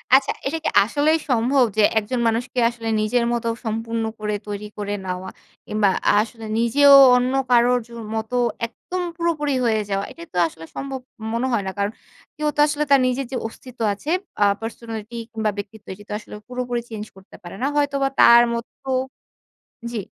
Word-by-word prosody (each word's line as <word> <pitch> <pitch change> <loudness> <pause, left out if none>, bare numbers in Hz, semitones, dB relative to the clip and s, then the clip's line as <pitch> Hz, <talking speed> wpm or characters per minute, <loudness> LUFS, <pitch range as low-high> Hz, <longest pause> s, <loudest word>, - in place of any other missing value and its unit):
আচ্ছা 270 0 +3 0.2
এটা 310 +4 -1
কি - - +1
আসলেই 290 +8 +2
সম্ভব 250 +2 +3
যে 215 - +5 0.2
একজন 240 +4 -3
মানুষকে 245 +3 -1
আসলে 235 -1 -7
নিজের 235 +3 +1
মতো 235 -1 -2 0.2
সম্পূর্ণ 225 +1 -2 0.2
করে 210 0 -2
তৈরি 205 0 -5
করে 205 0 -3
নেওয়া, 185 +1 -4 0.4
কিংবা 210 -2 +2 0.2
আ - - +2
আসলে 225 0 -10
নিজেও 280 +5 +6 0.2
অন্য 250 +1 +1 0.2
কারোর 245 +1 +4
জ - - -28 0.3
মত 220 +1 -3 0.4
একদম 365 +10 -6 0.2
পুরোপুরি 310 -5 0
হয়ে 220 -2 +2
যাওয়া? 195 0 -1
এইটা 335 - -11
তো 180 - -4
আসলে 165 0 -11
সম্ভব 270 -1 -4 0.3
মনে 235 +3 0
হয় 205 - +1
না - - -2
কারণ, 200 +1 0 0.5
কেউ 300 0 0
তো - - -6
আসলে 300 0 0
তার 275 - +7
নিজের 255 +2 -1
যে 255 - -2
অস্তিত্ব 250 +2 -14
আছে, 205 +9 -8 0.3
আ - - +7 0.2
পার্সোনালিটি 225 0 -7 0.2
কিংবা 220 -2 -1
ব্যক্তিত্ব 205 +1 -8
এটি 205 - -13
তো - - -8
আসলে 210 - -11
পুরোপুরি 245 -1 -3
চেঞ্জ 215 -2 -6
করতে 190 0 -16
পারে 175 - -9
না, 270 - +1
হয়তো 285 -1 +1
বা 270 - +2
তার 235 0 +8
মতো 235 +3 -7 1.0
জ্বি। 225 - -2
235 Hz, 180 wpm, -22 LUFS, 215-260 Hz, 1.0 s, তার